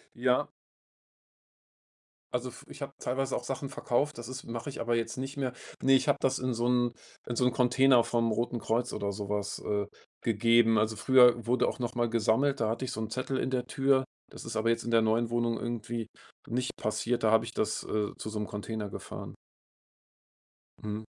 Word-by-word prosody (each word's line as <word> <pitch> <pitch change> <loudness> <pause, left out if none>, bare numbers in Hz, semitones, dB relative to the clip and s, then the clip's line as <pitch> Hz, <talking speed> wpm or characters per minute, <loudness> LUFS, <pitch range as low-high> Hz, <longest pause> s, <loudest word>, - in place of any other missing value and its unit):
Ja 125 +1 +2 1.8
also, 125 +1 -1
f 125 - -13
ich - - -11
habe 140 - -7
teilweise 135 +1 -1
auch - - -3
Sachen 135 +1 -4
verkauft, 140 +5 0
das 120 - -7
ist 130 +1 -6
mache 115 +4 -5
ich 135 - -8
aber 120 0 +1
jetzt 115 +1 -2
nicht 135 +2 -4
mehr. 130 -2 -1 0.3
Ne, 135 - +4
ich 135 - +4
habe - - +4
das 135 0 +2
in 130 -1 -1
so 120 +1 0
'n 120 -1 +2 0.3
in 120 - -2
so 125 - +2
'n 125 - +4
Container 125 0 +5
vom 115 -1 +1
Roten 120 +2 -1
Kreuz 120 +3 -1
oder 100 0 -2
so 100 0 -5
was, 105 0 -2
äh, 100 -1 -1 0.3
gegeben. 115 0 +4
Also, 110 +1 +1
früher 125 0 +5
wurde 125 +2 +3
auch - - -3
noch 120 -1 -3
mal 120 0 +2
gesammelt, 120 +5 +2
da 110 - +1
hatte 115 +4 -2
ich 130 - -4
so 110 - -4
'n 110 - -3
Zettel 130 +3 -2
in 130 - 0
der 125 -2 -1
Tür, 135 0 +2 0.3
das - - -10
ist - - -5
aber 110 +1 +1
jetzt 115 - +1
in 120 - -3
der 115 -1 +5
neuen 115 +1 +1
Wohnung 120 -1 +1
irgendwie 120 -1 -3 0.4
nicht 125 +2 -2
passiert, 115 +3 -1
da 110 - +4
habe 110 - +4
ich - - -6
das, - - -1
äh, 105 -1 -1
zu - - -5
so 110 - -5
'nem 105 - -2
Container 105 0 -4
gefahren. - - -7 1.5
Mhm. 105 +1 -4
120 Hz, 210 wpm, -30 LUFS, 110-130 Hz, 1.8 s, Container